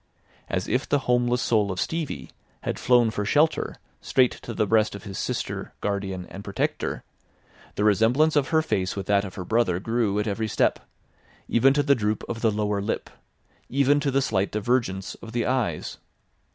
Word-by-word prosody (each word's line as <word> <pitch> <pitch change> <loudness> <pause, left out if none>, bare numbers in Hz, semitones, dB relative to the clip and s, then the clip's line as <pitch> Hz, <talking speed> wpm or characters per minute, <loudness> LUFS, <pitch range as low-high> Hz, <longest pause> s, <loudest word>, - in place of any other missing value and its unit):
As - - -1
if 130 +2 -1
the 145 - +4
homeless 125 0 +2
soul 105 -4 +2
of 90 - -4
Stevie 155 - -3 0.3
had - - -3
flown 120 -3 +4
for 105 - -2
shelter 150 +9 +2 0.3
straight 130 -3 +3
to - - -8
the 105 - +2
breast 110 0 +2
of 100 - -9
his 100 -3 -6
sister, - - -3
guardian 95 -3 -3
and 100 - -8
protector, 100 -1 -2 0.7
the 105 - 0
resemblance 115 +10 +3
of 145 -3 +3
her 160 -1 +2
face 95 -11 -1
with 100 -2 -4
that 100 0 +3
of 95 - -8
her 90 - -5
brother 110 -6 +1
grew 115 -1 0
at 105 - 0
every 110 +1 -1
step, - - +1 0.7
even 130 +4 +4
to 145 - +3
the 140 0 +4
droop 105 -4 -1
of 115 -1 -4
the 115 - +4
lower 105 -1 -1
lip, 100 - -3 0.6
even 140 +2 +3
to 145 -1 0
the 135 0 +2
slight 100 -4 0
divergence 105 -3 -1
of 115 - -9
the 120 -1 0
eyes. 120 -11 -1
110 Hz, 185 wpm, -25 LUFS, 100-125 Hz, 0.7 s, the